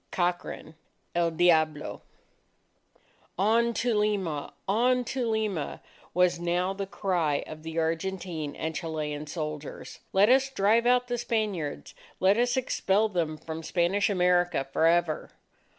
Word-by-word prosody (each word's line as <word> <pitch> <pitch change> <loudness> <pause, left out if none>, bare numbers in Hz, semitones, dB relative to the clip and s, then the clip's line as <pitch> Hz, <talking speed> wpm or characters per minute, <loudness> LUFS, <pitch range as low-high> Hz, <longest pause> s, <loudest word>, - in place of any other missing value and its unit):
COCHRANE, 175 -3 -2 0.4
EL 170 -1 +2
DIABLO 160 -3 +2 1.4
"On 225 +5 +3
to 245 -1 +1
Lima! 200 -8 0 0.2
On 250 +5 +3
to 255 -1 -2
Lima!" 215 -8 -2 0.4
was 180 -1 +3
now 175 +2 0
the 195 0 -4
cry 175 -7 0
of 155 0 -9
the 160 +1 -6
Argentine 165 -2 -2
and 160 0 -3
Chilean 155 -3 -4
soldiers. 155 -2 -6
"Let 195 +2 +5
us 265 +1 +4
drive 230 0 +2
out 250 0 +3
the 245 -1 -2
Spaniards! 200 - -2 0.3
Let 195 +3 +4
us 245 +1 +2
expel 220 -4 +1
them 165 -5 -1
from 160 +1 -6
Spanish 185 +6 +1
America 180 -5 +2
for 160 - +4
ever!" 170 -2 +1
180 Hz, 130 wpm, -28 LUFS, 160-210 Hz, 1.4 s, Let